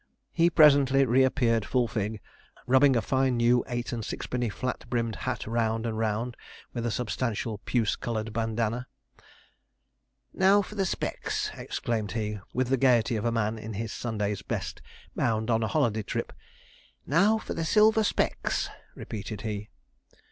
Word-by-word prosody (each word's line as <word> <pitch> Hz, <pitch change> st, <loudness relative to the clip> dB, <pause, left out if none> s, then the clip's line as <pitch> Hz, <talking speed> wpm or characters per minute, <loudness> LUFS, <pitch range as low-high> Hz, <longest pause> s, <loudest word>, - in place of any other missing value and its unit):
He 170 Hz, 0 st, +3 dB
presently 140 Hz, -4 st, +6 dB
reappeared 125 Hz, -2 st, +3 dB
full 125 Hz, +2 st, +1 dB
fig, 110 Hz, -1 st, -3 dB, 0.4 s
rubbing 130 Hz, +1 st, +5 dB
a 115 Hz, -, +1 dB
fine 130 Hz, -2 st, +1 dB
new 120 Hz, +1 st, +4 dB
eight 120 Hz, 0 st, -3 dB
and 115 Hz, -2 st, -3 dB
sixpenny 125 Hz, +2 st, -3 dB
flat 125 Hz, +6 st, -4 dB
brimmed 115 Hz, -2 st, -1 dB
hat 130 Hz, -4 st, -3 dB
round 115 Hz, 0 st, 0 dB
and 115 Hz, -1 st, -2 dB
round 115 Hz, +2 st, -1 dB, 0.4 s
with 120 Hz, -1 st, -2 dB
a -, -, +1 dB
substantial 115 Hz, -2 st, -2 dB
puce 115 Hz, -4 st, +1 dB
coloured 110 Hz, -2 st, -4 dB
bandana. 115 Hz, +2 st, -1 dB, 1.5 s
'Now 195 Hz, +2 st, +4 dB
for 205 Hz, -, -10 dB
the 195 Hz, -2 st, 0 dB
specs!' -, -, -2 dB
exclaimed 110 Hz, -4 st, -3 dB
he, 105 Hz, -2 st, -2 dB
with 125 Hz, 0 st, -1 dB
the 135 Hz, -, +3 dB
gaiety 120 Hz, -2 st, +3 dB
of 110 Hz, +1 st, -2 dB
a 120 Hz, -, +2 dB
man 110 Hz, -1 st, -1 dB
in 110 Hz, +1 st, -6 dB
his 110 Hz, +2 st, -4 dB
Sunday's 105 Hz, -4 st, -2 dB
best, -, -, -4 dB, 0.3 s
bound 110 Hz, 0 st, 0 dB
on 115 Hz, 0 st, +2 dB
a 110 Hz, -, 0 dB
holiday 115 Hz, -8 st, +1 dB
trip. -, -, -4 dB, 0.7 s
'Now 195 Hz, +9 st, +4 dB
for 220 Hz, -, -5 dB
the 165 Hz, -, -2 dB
silver 215 Hz, +5 st, +4 dB
specs!' -, -, 0 dB, 0.3 s
repeated 105 Hz, -1 st, -6 dB
he. 105 Hz, -2 st, -4 dB
120 Hz, 155 wpm, -28 LUFS, 110-130 Hz, 1.5 s, presently